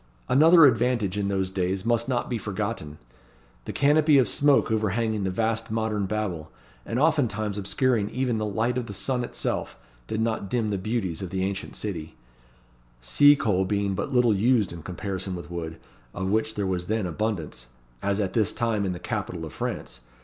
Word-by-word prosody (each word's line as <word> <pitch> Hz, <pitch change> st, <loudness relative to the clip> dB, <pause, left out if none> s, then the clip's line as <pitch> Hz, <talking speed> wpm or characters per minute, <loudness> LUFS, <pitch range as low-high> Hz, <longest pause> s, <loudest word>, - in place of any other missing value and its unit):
Another 160 Hz, +4 st, +7 dB
advantage 120 Hz, -5 st, +2 dB
in 100 Hz, -1 st, -1 dB
those 95 Hz, -1 st, -1 dB
days 95 Hz, +1 st, -1 dB
must 115 Hz, +1 st, +1 dB
not 120 Hz, -2 st, 0 dB
be 120 Hz, -3 st, -2 dB
forgotten. 100 Hz, -7 st, -4 dB, 0.7 s
The -, -, -4 dB
canopy 150 Hz, +1 st, +4 dB
of 130 Hz, -4 st, +4 dB
smoke 140 Hz, 0 st, +3 dB
overhanging 110 Hz, -1 st, 0 dB
the -, -, 0 dB
vast 115 Hz, +3 st, -1 dB
Modern 110 Hz, -2 st, -1 dB
Babel, 95 Hz, -7 st, -3 dB, 0.4 s
and 115 Hz, -, -2 dB
oftentimes 120 Hz, -9 st, +1 dB
obscuring 105 Hz, +1 st, +1 dB
even 125 Hz, -3 st, -1 dB
the 110 Hz, -, -1 dB
light 115 Hz, +4 st, 0 dB
of 120 Hz, -, -6 dB
the 100 Hz, -, -6 dB
sun 125 Hz, +3 st, -1 dB
itself, -, -, -3 dB, 0.3 s
did 110 Hz, -, -2 dB
not 110 Hz, -3 st, -1 dB
dim 115 Hz, -2 st, 0 dB
the 100 Hz, -2 st, -1 dB
beauties 95 Hz, -5 st, -2 dB
of 95 Hz, -, -4 dB
the 95 Hz, 0 st, -2 dB
Ancient 95 Hz, 0 st, -3 dB
City, 85 Hz, -7 st, -5 dB, 0.8 s
sea 145 Hz, -, +6 dB
coal 100 Hz, -9 st, +1 dB
being 100 Hz, 0 st, 0 dB
but 135 Hz, -, -3 dB
little 125 Hz, -3 st, +4 dB
used 110 Hz, -1 st, +2 dB
in 85 Hz, -, -8 dB
comparison 95 Hz, +2 st, -4 dB
with 85 Hz, -1 st, -8 dB
wood, 80 Hz, -1 st, -5 dB, 0.4 s
of 95 Hz, +1 st, -2 dB
which 110 Hz, +1 st, 0 dB
there 100 Hz, -, -1 dB
was 90 Hz, -2 st, -2 dB
then 110 Hz, -2 st, 0 dB
abundance, 85 Hz, -, -3 dB, 0.3 s
as 100 Hz, +1 st, 0 dB
at 95 Hz, -3 st, -1 dB
this 110 Hz, -3 st, +2 dB
time 110 Hz, -3 st, 0 dB
in 95 Hz, -, -1 dB
the 90 Hz, -, -7 dB
capital 95 Hz, -6 st, -4 dB
of 80 Hz, -, -9 dB
France. -, -, -4 dB
105 Hz, 185 wpm, -26 LUFS, 95-120 Hz, 0.8 s, Another